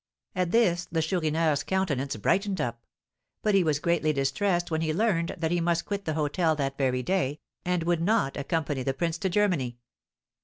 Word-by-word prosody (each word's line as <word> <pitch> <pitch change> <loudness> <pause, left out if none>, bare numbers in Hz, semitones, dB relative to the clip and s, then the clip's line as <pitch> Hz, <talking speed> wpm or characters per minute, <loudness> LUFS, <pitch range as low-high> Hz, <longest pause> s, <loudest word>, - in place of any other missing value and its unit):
At 180 -1 0
this 180 -5 +2
the 160 -1 +1
Chourineur's 160 -3 +1
countenance 145 -9 -1
brightened 195 - 0
up; 120 -1 -2 0.6
but 210 - +2
he 195 -2 +5
was 155 -3 +2
greatly 155 0 +1
distressed 175 +6 0
when 160 0 0
he 155 -1 0
learned 185 -5 +1
that 160 0 -1
he 175 -1 +1
must 170 0 +1
quit 200 -1 -4
the 155 - -1
hôtel 155 +1 +1
that 135 -2 -1
very 130 -2 0
day, 155 -5 0 0.2
and 180 -1 0
would 170 -1 +1
not 205 -6 +1
accompany 145 -1 -1
the 135 +1 -1
prince 165 +2 -1
to 190 - 0
Germany. 175 -11 +1
165 Hz, 185 wpm, -27 LUFS, 145-180 Hz, 0.6 s, he